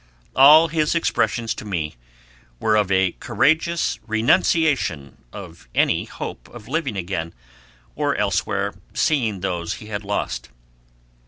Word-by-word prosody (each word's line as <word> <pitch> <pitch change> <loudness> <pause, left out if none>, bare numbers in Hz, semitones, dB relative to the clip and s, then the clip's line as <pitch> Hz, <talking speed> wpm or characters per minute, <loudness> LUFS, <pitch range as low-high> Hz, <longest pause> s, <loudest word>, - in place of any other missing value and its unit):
All 150 +5 +8
his 155 0 0
expressions 120 -8 0
to - - -9
me 85 -7 -3 0.7
were 110 +8 +2
of 105 -3 +1
a 95 -1 +3
courageous, 160 +2 +1
renunciation 115 - +1
of 85 -9 -11
any - - +2
hope - - -8
of 120 -3 -12
living 140 -7 -2
again, 85 -4 -4 0.6
or - - 0
elsewhere - - -1 0.2
seeing 115 - +1
those 90 -2 -2
he 105 - -10
had 100 +1 -3
lost. 100 -12 -3
105 Hz, 120 wpm, -22 LUFS, 90-150 Hz, 0.7 s, All